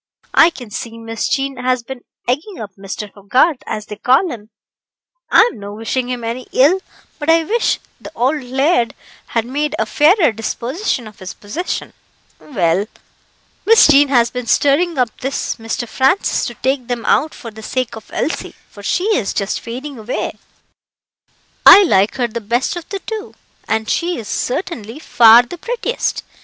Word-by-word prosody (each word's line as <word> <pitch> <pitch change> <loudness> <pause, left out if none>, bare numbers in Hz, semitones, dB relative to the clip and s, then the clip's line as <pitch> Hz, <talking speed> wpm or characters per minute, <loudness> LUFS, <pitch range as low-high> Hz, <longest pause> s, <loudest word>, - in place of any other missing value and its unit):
I 330 - +7
can 245 -9 -11
see 230 +1 -6
Miss 225 -1 -4
Jean 275 -1 -1
has 250 -1 0
been 260 +1 -8 0.3
egging 310 - -2
up 210 -2 -7
Mr. 200 +1 -7
Hogarth, 250 - +1
as 215 -1 -4
they 210 - -8
call 265 - +3
him 215 -4 -9 0.8
I'm 470 - +4
no 205 0 -8
wishing 245 +3 -2
him 245 -2 -4
any 235 +3 -4
ill, 300 +9 +4 0.4
but 295 +1 -3
I 330 0 +5
wish 455 +8 0 0.2
the - - -9
auld 270 +6 +1
laird 260 0 +1 0.3
had 230 -1 -1
made 295 +4 -2
a - - 0
fairer 320 - +4
disposition 240 - -3
of 215 -1 -13
his 185 0 -8
possessions 315 - -5 0.5
well, 195 - 0 0.8
Miss 455 0 +7
Jean 290 -1 +6
has 240 -4 +3
been 250 -1 -5
stirring 295 +7 +2
up 245 -3 0
this 270 +2 -3
Mr. 225 +1 -4
Francis 265 - +1
to 240 - -7
take 260 +1 -1
them 240 -2 -3
out 310 - +2
for 230 - -9
the 220 +1 -11
sake 255 +2 -3
of 220 - -12
Elsie, 320 - -3 0.2
for 205 - -12
she 355 - 0
is 200 -5 -1
just 200 -1 -1
fading 255 +3 -7
away." 220 +3 -3 1.3
"I 405 - +10
like 200 - +2
her 245 -2 0
the 235 0 -6
best 235 - -1
of 345 -2 -8
the 395 -1 -4
two, 440 -2 -6 0.3
and 220 0 -1
she 350 +7 0
is 225 -4 -7
certainly 250 - -3
far 235 -6 +6
the 345 +8 -10
prettiest. 480 +2 -2
250 Hz, 170 wpm, -17 LUFS, 225-300 Hz, 1.3 s, I